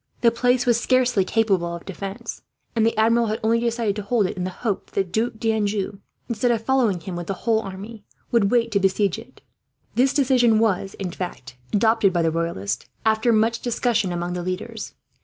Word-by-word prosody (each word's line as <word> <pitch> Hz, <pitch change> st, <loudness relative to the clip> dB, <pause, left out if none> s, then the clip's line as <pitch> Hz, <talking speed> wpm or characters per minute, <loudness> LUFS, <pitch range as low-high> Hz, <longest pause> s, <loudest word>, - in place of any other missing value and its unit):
The 235 Hz, -, +5 dB
place 245 Hz, +1 st, +2 dB
was 235 Hz, -1 st, +3 dB
scarcely 250 Hz, -5 st, +3 dB
capable 185 Hz, -5 st, +1 dB
of 170 Hz, -, -10 dB
defence, 195 Hz, +1 st, -6 dB, 0.3 s
and 225 Hz, -, +2 dB
the 225 Hz, 0 st, +1 dB
Admiral 230 Hz, +1 st, +3 dB
had 215 Hz, +1 st, -2 dB
only 230 Hz, +1 st, +3 dB
decided 230 Hz, -3 st, 0 dB
to -, -, -2 dB
hold 210 Hz, +1 st, +1 dB
it -, -, -3 dB
in 180 Hz, -1 st, -3 dB
the -, -, -2 dB
hope 205 Hz, +2 st, -3 dB
that -, -, -26 dB
the 195 Hz, -, +3 dB
Duc 220 Hz, +6 st, -1 dB
d'Anjou, 210 Hz, -3 st, -1 dB, 0.3 s
instead 235 Hz, +1 st, 0 dB
of 230 Hz, -2 st, +1 dB
following 245 Hz, -9 st, +2 dB
him 180 Hz, +2 st, -6 dB
with 175 Hz, -1 st, -5 dB
his 195 Hz, -, -3 dB
whole 225 Hz, +1 st, +1 dB
army, 200 Hz, +2 st, -8 dB, 0.3 s
would 225 Hz, -4 st, +3 dB
wait 235 Hz, -1 st, +2 dB
to 200 Hz, -, +2 dB
besiege 195 Hz, +1 st, +1 dB
it. 250 Hz, +3 st, -15 dB, 0.5 s
This 260 Hz, +2 st, +3 dB
decision 250 Hz, -5 st, +3 dB
was, 200 Hz, -3 st, +1 dB
in 185 Hz, -3 st, -4 dB
fact, 150 Hz, -8 st, -6 dB, 0.2 s
adopted 220 Hz, -1 st, +3 dB
by 170 Hz, -1 st, +1 dB
the 165 Hz, -, +2 dB
Royalists, 165 Hz, -, -2 dB, 0.2 s
after 220 Hz, +2 st, +3 dB
much 225 Hz, +1 st, +2 dB
discussion 230 Hz, -5 st, 0 dB
among 175 Hz, 0 st, -3 dB
the 180 Hz, -, -3 dB
leaders. 185 Hz, +2 st, -5 dB
220 Hz, 200 wpm, -23 LUFS, 190-235 Hz, 0.5 s, The